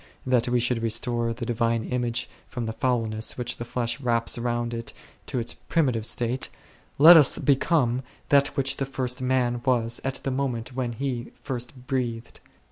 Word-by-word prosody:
that 125 -1 +2
we 125 0 +2
should 120 -1 0
restore 115 +1 0
the 115 +1 -5
divine 115 0 0
image 120 +1 -2 0.2
from 120 -3 -4
the 110 - -3
foulness 115 -2 -1
which 125 0 -1
the - - -4
flesh 120 +1 -2
wraps 115 -2 +1
round 120 0 -1
it 115 -2 -6 0.3
to - - -3
its 120 0 -2
primitive 125 -9 0
state, 120 +2 0 0.5
let 165 +5 +10
us 150 -5 +7
become 135 -3 +2 0.3
that 140 0 +3
which 135 0 +1
the 135 - -1
First 130 -2 -3
Man 125 -2 +1
was 120 -3 +1
at 135 0 -2
the 135 - -1
moment 130 -3 -2
when 125 -2 -2
he 125 -1 -4
first 125 -1 -5
breathed. 120 -3 -3
120 Hz, 170 wpm, -25 LUFS, 115-130 Hz, 0.5 s, let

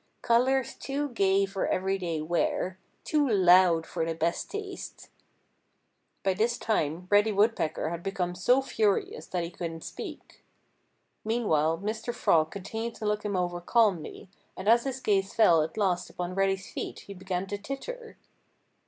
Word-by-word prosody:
"Colors 255 +2 +2
too 285 +1 -3
gay 195 -4 +2
for 195 0 -2
everyday 185 -4 -1
wear! 175 +3 -1 0.2
Too 295 -3 +1
loud 180 -4 +5
for 165 -1 -3
the 165 0 -2
best 165 +1 -1
taste!" 400 -2 -7 1.1
By 190 - +2
this 225 +5 0
time 170 -5 -1
Reddy 205 +2 +5
Woodpecker 200 -7 +1
had 170 0 -4
become 180 -2 -2
so 245 +9 +3
furious 215 -6 0
that 180 -2 -2
he 170 - -5
couldn't 165 -2 -6
speak. - - -9 0.8
Meanwhile 165 -9 +1
Mr. 220 +3 -3
Frog 155 -1 +3
continued 220 +5 -5
to 215 - -6
look 210 0 0
him 205 -2 -2
over 175 -1 -1
calmly, 200 -4 +1 0.3
and 190 - -6
as 235 +3 +5
his 265 -1 -3
gaze 195 -3 +1
fell 175 -8 +6
at 160 +5 -4
last 185 -4 0
upon 180 0 -5
Reddy's 195 0 0
feet - - -5
he 200 - -10
began 190 -1 -3
to 205 +1 -5
titter. 455 - -7
195 Hz, 155 wpm, -28 LUFS, 175-225 Hz, 1.1 s, fell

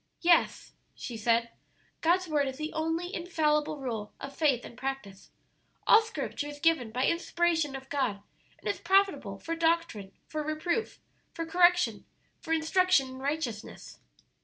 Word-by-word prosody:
"Yes," 345 0 +2 0.2
she 240 - -7
said, 230 +1 +1 0.5
"God's 355 +3 +2
Word 295 -3 +1
is 265 0 -5
the 305 +1 -4
only 325 +3 -2
infallible 305 -4 0
rule 225 -6 -5
of 275 0 -8
faith 275 -6 +2
and - - -11
practice. 250 -7 -6 0.6
All 445 - +7
scripture 440 -9 -4
is 290 0 -8
given 320 -8 +2
by 250 +4 0
inspiration 335 -4 +1
of 265 0 -8
God, 255 -8 -1 0.3
and - - -9
is 205 - -1
profitable 390 +2 +2
for 330 - -4
doctrine, 330 - 0
for 310 - -4
reproof, 310 +8 -2 0.4
for 330 - -3
correction, 355 +1 +3 0.3
for 325 - -7
instruction 325 -3 +3
in 260 0 -9
righteousness!" 270 -6 -4
305 Hz, 145 wpm, -29 LUFS, 260-335 Hz, 0.6 s, All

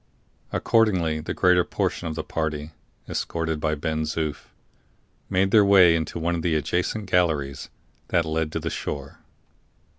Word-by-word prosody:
Accordingly 95 -9 +2
the 75 - -5
greater 90 -1 +4
portion 85 - -2
of 80 - -4
the 80 - -3
party, 75 -1 -3 0.4
escorted 80 -2 -2
by 75 0 0
Ben 80 +1 -2
Zoof, 75 -1 -3 0.8
made 95 0 +2
their 105 -2 +7
way 95 -4 +6
into 80 +1 -3
one 85 +1 -1
of 85 - -2
the 80 -1 0
adjacent 90 +7 -1
galleries 80 -7 0 0.4
that 85 - +1
led 80 0 -1
to - - -1
the - - -4
shore. 70 -1 -5
80 Hz, 150 wpm, -24 LUFS, 80-90 Hz, 0.8 s, their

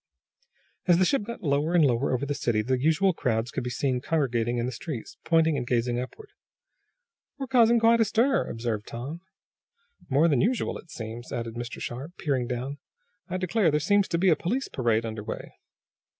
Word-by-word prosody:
As 175 - +6
the 185 - +4
ship 275 +6 +2
got 235 +1 -7
lower 150 +3 +1
and 165 -4 +6
lower 125 +1 +1
over 130 +2 0
the 145 - -1
city 120 -6 0
the 130 +2 0
usual 165 +6 +3
crowds 115 -4 -1
could - - -3
be 125 - -3
seen 125 0 -1
congregating 120 -6 0
in 120 - 0
the 125 - -2
streets, 125 0 -6
pointing 165 -1 +3
and 120 -2 -3
gazing 120 0 +1
upward. 415 - -8 1.1
"We're 275 - -3
creating 235 -2 +4
quite 230 0 +5
a - - +5
stir," 235 +6 +2
observed 115 -2 -3
Tom. 135 +9 -6 0.9
"More 145 +5 +4
than 140 -7 +3
usual, 245 +3 0
it 170 - -16
seems," 115 -2 -7
added 115 -1 -4
Mr. 120 +1 -6
Sharp, 140 +9 -6
peering 135 -6 -1
down. 130 +3 -4 0.5
"I 185 - -1
declare, 185 +2 +2
there 150 0 +2
seems 205 +5 +3
to 170 - 0
be 185 +2 +3
a 165 - +5
police 245 - -2
parade 115 -3 +1
under 110 -1 -5
way." - - -6
140 Hz, 195 wpm, -27 LUFS, 120-180 Hz, 1.1 s, As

